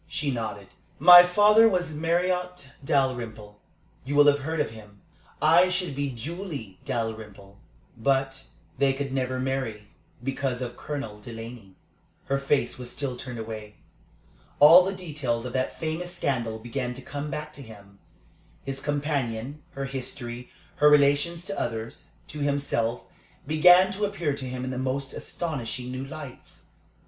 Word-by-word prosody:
She 145 -1 -2
nodded. 110 -5 -5 0.3
"My 175 +4 +11
father 210 +5 +5
was 180 -5 -1
Marriott 180 -1 -1
Dalrymple. 115 -7 -1 0.4
You 140 +3 -3
will 145 0 +7
have 145 -1 +5
heard 160 +3 -3
of 150 - 0
him. 105 -2 -14 0.4
I 165 +4 +5
should 180 -5 -2
be 140 0 -1
Julie 135 - -7
Dalrymple, 110 -6 -5 0.4
but 135 +2 0 0.3
they 140 -1 +3
could 135 0 -4
never 130 -1 -1
marry 130 -6 -3 0.3
because 135 -1 -2
of 120 -1 -6
Colonel 140 -9 -6
Delaney." 115 -3 -9 0.5
Her 140 0 0
face 140 -3 0
was 125 -1 -7
still 130 -1 -4
turned 125 -1 -7
away. 110 -2 -7 0.8
All 165 +5 +9
the 195 +1 -2
details 145 -10 -3
of 125 - -5
that 130 0 -2
famous 165 +3 -3
scandal 120 -9 -1
began 125 +2 -4
to 130 - -9
come 145 +2 -5
back 150 +1 -5
to 145 - -11
him. 100 -5 -14 0.6
His 135 0 -4
companion, 145 -2 -2
her 135 0 -4
history, 125 -2 -5 0.3
her 150 - +6
relations 150 +4 +3
to 195 0 -4
others, 115 -1 -5 0.2
to 150 - -7
himself, 140 -5 -1 0.4
began 180 +5 +6
to 205 +2 -1
appear 175 -8 -2
to 130 -2 -6
him 125 0 -5
in 130 - -3
the 130 - -4
most 135 +1 -2
astonishing 130 -6 -4
new 130 +1 -5
lights. 140 -2 -10
135 Hz, 150 wpm, -26 LUFS, 120-150 Hz, 0.8 s, My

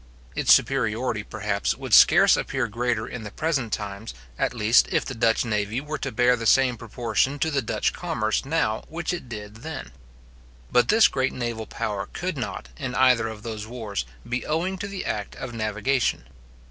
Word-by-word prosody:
Its - - +2
superiority, - - +2
perhaps, - - -2
would - - -5
scarce - - +7
appear 135 -2 -1
greater 115 0 -1
in 125 - -6
the 105 - -6
present 135 -3 -1
times, 100 +1 -5 0.2
at - - +1
least 115 0 +4
if - - +1
the 135 - -5
Dutch 115 -1 +2
navy 105 +1 -1
were 150 +2 -5
to - - -3
bear 125 +2 +4
the 115 -2 -3
same 130 0 +4
proportion 120 +4 -1
to 160 +3 0
the 140 -2 +1
Dutch 115 - -1
commerce 110 0 -1
now 135 -7 0
which 170 +2 -3
it 170 -8 -6
did 105 -1 -8
then. 150 - -7 0.8
But 120 -1 +4
this 220 0 +6
great 130 0 -1
naval 120 -3 -4
power 100 -2 -3
could - - -3
not, 60 - -5
in 125 - -4
either 125 -3 +4
of 110 -1 -8
those 110 -2 -5
wars, 110 - -4 0.2
be 120 +1 -2
owing 180 +5 -1
to 200 - -3
the 200 -1 -5
act 105 -1 -3
of 130 -2 -7
navigation. 110 - 0
120 Hz, 185 wpm, -25 LUFS, 110-135 Hz, 0.8 s, scarce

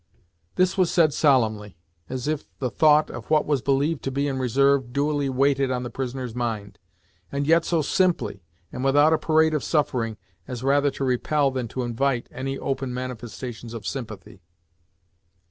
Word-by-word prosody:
This 185 +1 +2
was 180 -2 +4
said 160 -5 +3
solemnly, 110 - +1 0.3
as 130 +1 -4
if 155 -1 -2
the 125 -3 -2
thought 155 -1 +4
of - - -9
what 155 -1 +3
was 145 -4 0
believed 140 +4 +1
to 135 - -1
be 140 +2 -1
in 135 -2 -2
reserve 130 +1 +2
duly 145 +1 0
weighed 135 +1 +2
on 125 -1 -1
the 120 - -6
prisoner's 130 -2 -4
mind, 110 -5 -4 0.5
and 140 0 -1
yet 165 +2 +4
so 165 -3 +1
simply, 175 - 0 0.3
and 125 - -5
without 145 +3 +4
a 160 - +2
parade 160 0 +3
of 150 - -1
suffering, 120 -8 0 0.3
as 125 -2 -6
rather 140 +1 +3
to 135 - -5
repel 135 +2 +1
than 130 -2 -3
to 125 +3 -4
invite 120 +1 -1
any 135 +1 -4
open 135 -1 -3
manifestations 120 -1 -6
of 110 -4 -8
sympathy. 110 -8 -7
135 Hz, 170 wpm, -24 LUFS, 125-145 Hz, 0.5 s, was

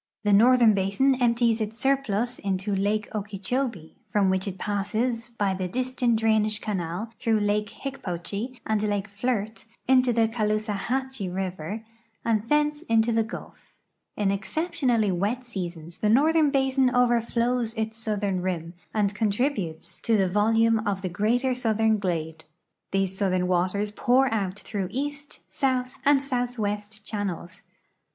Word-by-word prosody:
The 205 -1 +3
northern 235 +1 +6
l)asin 200 +8 +2
emi)ties 235 -2 +2
its 215 +1 -3
surplus 250 -3 0
into 195 +1 -1
lake 205 +2 0
Okee 205 -1 -4
chobee, 220 - -3
from 200 -2 +3
which 190 +1 -1
it 190 -1 -4
passes 220 +4 -1
by 205 -5 0
the 185 -1 -2
Disston 250 +2 0
drainage 220 -1 +2
canal 190 +1 -3
through 225 -3 +2
lake 205 0 0
IIicj)ochee 230 -1 -5
and 215 -1 +1
lake 205 -1 -1
Flirt 220 +1 -2 0.2
into 255 -1 +5
the 230 -1 +3
Caloosahatchee 220 +1 -1
river 190 +3 -4 0.4
and 220 -3 +2
tlience 295 +1 +2
into 225 +1 +3
the 225 0 +3
Gulf. 220 +2 -9 0.4
In 205 -2 +1
exceptionalh'^ 240 - 0
wet 215 +8 -1
seasons 175 -7 -6
tlie 210 - +2
northern 305 +5 +4
basin 265 -1 +2
overflows 240 -1 +1
its 220 0 -2
southern 205 -4 -1
rim, 170 -2 -3 0.2
and 205 -2 +2
contributes 205 - -1
to 225 -2 +2
the 190 -2 +3
volume 225 +3 +3
of 200 -3 -2
the 185 - -1
greater 235 +8 +1
southern 220 -3 +1
glade. 160 -4 -3 0.5
These 195 -1 0
southern 185 -2 +1
waters 185 +3 0
pour 255 +3 +3
out 200 -3 -1
through 200 -2 -4
east, 285 +3 -5
south, 255 -2 0
and 280 -1 +4
southwest 220 -5 -3
channels. 195 -5 -5
215 Hz, 140 wpm, -26 LUFS, 195-245 Hz, 0.5 s, northern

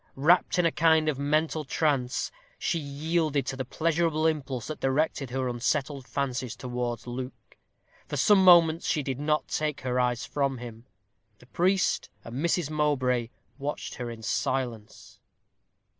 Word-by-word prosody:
Wrapped 165 +8 +3
in 180 - +3
a 165 - +3
kind 160 -1 +3
of 140 -3 -2
mental 155 +2 +1
trance, 135 -3 0 0.3
she 170 - -1
yielded 150 0 -1
to 135 - -3
the 130 - -3
pleasurable 160 +3 0
impulse 140 -7 -1
that 155 - -6
directed 135 0 0
her 130 0 -1
unsettled 130 +2 -1
fancies 130 -3 -2
towards 120 -1 -4
Luke. 125 +1 -7 0.5
For - - -4
some 205 -2 +5
moments 170 -2 +6
she 150 - +1
did 135 -1 -3
not 150 +1 0
take 150 -2 -2
her 125 0 -1
eyes 125 -1 0
from 140 -2 -1
him. 115 -1 -10 0.5
The 125 - -18
priest 185 +8 +1
and 115 - -8
Mrs. 165 0 0
Mowbray 130 -6 +1 0.3
watched 145 +2 -4
her 120 -3 -5
in 115 -1 -9
silence. 115 -1 -3
140 Hz, 150 wpm, -27 LUFS, 125-155 Hz, 0.5 s, moments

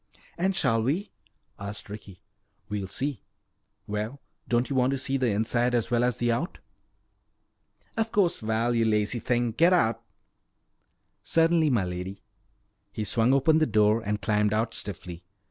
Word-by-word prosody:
"And 190 +2 0
shall 115 -8 +2
we?" 155 - -1 0.5
asked 100 +1 -7
Ricky. 100 -2 -10 0.5
"We'll 100 -2 -3
see. 130 +4 -3 0.6
Well, 105 +6 -4 0.3
don't 120 +1 +1
you 140 - -3
want 130 0 +3
to - - -1
see 135 +1 -2
the 130 -2 +1
inside 120 +4 +1
as 120 0 -1
well 120 0 +3
as 125 -2 +1
the 120 0 +1
out?" 150 +11 -2 1.4
"Of 225 0 -1
course! 190 -5 +2
Val, 110 +2 0
you 115 -1 +2
lazy 105 +1 +1
thing, 120 0 0
get 170 +10 +4
out!" 115 -10 +2 1.2
"Certainly, 165 -1 +3
m'lady." 95 -4 -2 0.7
He 110 - -4
swung 115 +3 +2
open 145 +4 +4
the 155 - +2
door 105 0 +3
and 105 -1 -1
climbed 105 0 +2
out 110 +1 0
stiffly. 90 -5 -5
115 Hz, 150 wpm, -27 LUFS, 105-135 Hz, 1.4 s, get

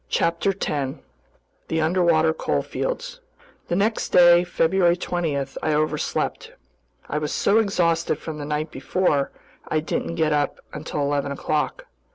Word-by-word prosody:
CHAPTER 170 +4 +1
10 145 -8 -3 0.7
The 160 - -1
Underwater 160 -1 +3
Coalfields - - -3 0.5
THE 175 - -1
NEXT 215 +4 0
DAY, 175 -1 +7
February 175 0 +2
20, 175 -5 -1
I 140 +3 -2
overslept. 155 +1 -1 0.5
I 150 - -1
was 150 -1 -3
so 210 +3 +3
exhausted 170 -7 +1
from 155 -1 -7
the 145 - -5
night 150 +1 -2
before, 140 +1 0 0.4
I 155 - +1
didn't 160 +1 -3
get 155 -2 +2
up 145 -1 0
until 150 0 -4
eleven 140 0 0
o'clock. 155 - -2
160 Hz, 135 wpm, -23 LUFS, 150-180 Hz, 0.7 s, DAY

